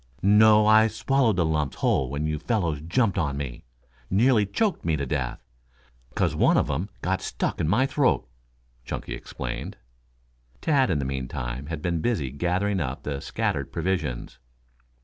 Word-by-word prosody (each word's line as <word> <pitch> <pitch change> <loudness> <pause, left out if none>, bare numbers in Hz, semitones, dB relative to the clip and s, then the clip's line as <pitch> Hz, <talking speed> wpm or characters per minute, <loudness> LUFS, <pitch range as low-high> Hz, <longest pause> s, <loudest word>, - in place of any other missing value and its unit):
"No, 105 +1 +6
I 110 +1 +6
swallowed 115 +2 +1
the 85 -2 +2
lumps 75 -3 -1
whole 65 -2 +1
when 70 +3 -2
you 75 -1 -1
fellows 85 -6 -1
jumped 95 +4 +1
on 70 -5 -1
me. 70 -4 -6 0.4
Nearly 110 +1 +3
choked 210 - 0
me 80 -2 +1
to 70 - -2
death, 65 -3 -2 0.8
'cause - - +1
one - - +3
of - - +1
'em 85 +9 -2
got 95 +1 0
stuck - - -2
in - - 0
my 110 +10 +3
throat," 135 - +1 0.6
Chunky - - -5
explained. - - -6 0.8
Tad, 140 -5 +2
in 80 - +1
the 70 - -2
meantime, 65 0 -4
had 80 -1 -5
been 85 -2 0
busy 80 - -1
gathering 90 +7 0
up 65 -6 -4
the 70 -2 -3
scattered - - -2
provisions. 80 -10 -3
85 Hz, 160 wpm, -25 LUFS, 70-105 Hz, 0.8 s, No